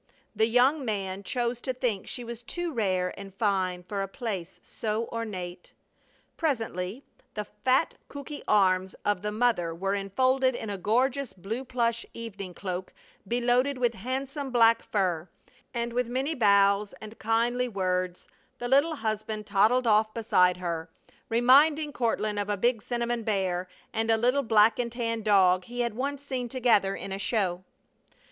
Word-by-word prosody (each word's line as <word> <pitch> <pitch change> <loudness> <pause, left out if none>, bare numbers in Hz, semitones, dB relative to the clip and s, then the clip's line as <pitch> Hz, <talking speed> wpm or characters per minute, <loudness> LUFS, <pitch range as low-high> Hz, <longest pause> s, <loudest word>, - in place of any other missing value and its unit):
The 220 +1 +3
young 260 +5 +3
man 195 -4 -3
chose 240 +2 -2
to 260 - -2
think 240 -6 -2
she 245 - -4
was 235 0 -7
too 345 +6 -4
rare 185 -6 0
and 195 -1 -8
fine 190 -3 0
for 200 +2 -3
a 195 - -2
place 195 -4 -5
so 220 +1 -3
ornate. 185 -6 -6 0.6
Presently 225 - -2 0.3
the 210 -1 -3
fat 255 +9 +1 0.2
cooky 285 +1 -7
arms 190 -2 +3
of 205 -3 +1
the 210 - -2
mother 210 -7 +1
were 195 +3 -1
enfolded 255 +6 +1
in 220 -3 -5
a 200 - -3
gorgeous 255 +6 +1
blue 215 +7 -5
plush 235 -2 0
evening 200 -6 -7
cloak 185 -1 -5 0.4
beloaded 245 +4 +2
with 240 -2 +1
handsome 265 +6 -4
black 230 -2 +5
fur; 185 -4 -1 0.4
and 235 -1 -3
with 245 0 0
many 265 +6 -1
bows 200 -4 +3
and 215 +1 -11
kindly 235 +3 +1
words 185 -3 -2 0.3
the 245 - -4
little 285 +5 +3
husband 215 -3 -3
toddled 220 +5 +3
off 215 -1 +3
beside 180 -6 +3
her, 170 -2 -4 0.4
reminding 290 +6 +5
Courtland 215 -3 0
of 205 0 -2
a 205 - 0
big 235 +2 +1
cinnamon 240 +1 -2
bear 190 -4 -1 0.3
and 225 0 -1
a 225 - +4
little 250 +5 +2
black 220 -2 +4
and 235 -1 -1
tan 230 -2 -2
dog 185 -4 +4
he 245 +1 -4
had 235 -2 -1
once 280 +4 -3
seen 255 -3 -3
together 225 -6 +2
in 195 - -6
a 195 - -3
show. 185 -5 0
225 Hz, 160 wpm, -28 LUFS, 195-245 Hz, 0.6 s, black